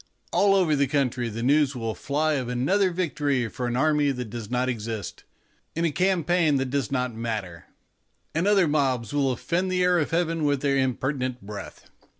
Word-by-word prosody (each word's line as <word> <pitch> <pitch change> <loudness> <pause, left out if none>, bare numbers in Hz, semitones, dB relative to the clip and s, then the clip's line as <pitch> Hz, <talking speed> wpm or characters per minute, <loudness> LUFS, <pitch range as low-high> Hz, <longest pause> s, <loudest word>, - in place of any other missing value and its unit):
All 200 -1 +4
over 175 -6 +3
the 140 -1 +2
country 125 -4 0
the 115 +2 -5
news 140 +1 +3
will 115 -2 -3
fly 155 +5 0
of 130 -4 -2
another 185 +11 +2
victory 145 -8 -1
for 125 +2 -4
an 120 - -2
army 150 0 +2
that 125 -5 -4
does 115 -3 -6
not 125 +1 0
exist, 110 -5 -5 0.5
in 165 +1 0
a 165 - +1
campaign 175 -2 +2
that 135 -1 -1
does 140 -4 -1
not 125 -2 -1
matter; 110 -7 -5 0.7
and 165 +5 0
other 200 -4 +4
mobs 135 -6 0
will 140 -2 +2
offend 180 +8 -1
the 180 0 +1
air 180 -1 +3
of 150 - -1
heaven 165 -1 0
with 145 -2 +1
their 140 -1 +1
impertinent 130 -1 -1
breath. 100 0 -9
140 Hz, 185 wpm, -25 LUFS, 125-160 Hz, 0.7 s, All